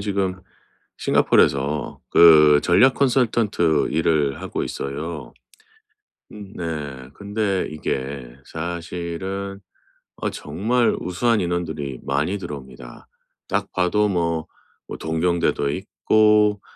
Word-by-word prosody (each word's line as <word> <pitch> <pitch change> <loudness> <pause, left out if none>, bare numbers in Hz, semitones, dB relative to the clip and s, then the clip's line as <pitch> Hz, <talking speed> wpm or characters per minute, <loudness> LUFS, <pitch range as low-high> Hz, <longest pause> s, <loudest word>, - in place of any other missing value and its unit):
지금 95 -2 -2 0.6
싱가포르에서 70 +2 +1
그 75 -3 +7
전략 130 +10 +4
컨설턴트 115 - +2
일을 75 -3 +1
하고 - - -3
있어요. 75 +3 -5 1.0
음 105 -1 -11
네. 75 -6 -5
근데 100 -1 -2
이게 65 -4 -4
사실은 85 +4 -5 0.6
어 - - -2
정말 110 +11 0
우수한 115 +5 0
인원들이 80 -7 -3
많이 75 +8 -1
들어옵니다. 65 -8 -10 0.4
딱 - - -2
봐도 95 +4 +2
뭐 85 -4 -1 0.4
뭐 - - -5
동경대도 80 -2 0
있고 105 +3 +2
85 Hz, 210 characters per minute, -22 LUFS, 75-100 Hz, 1.0 s, 그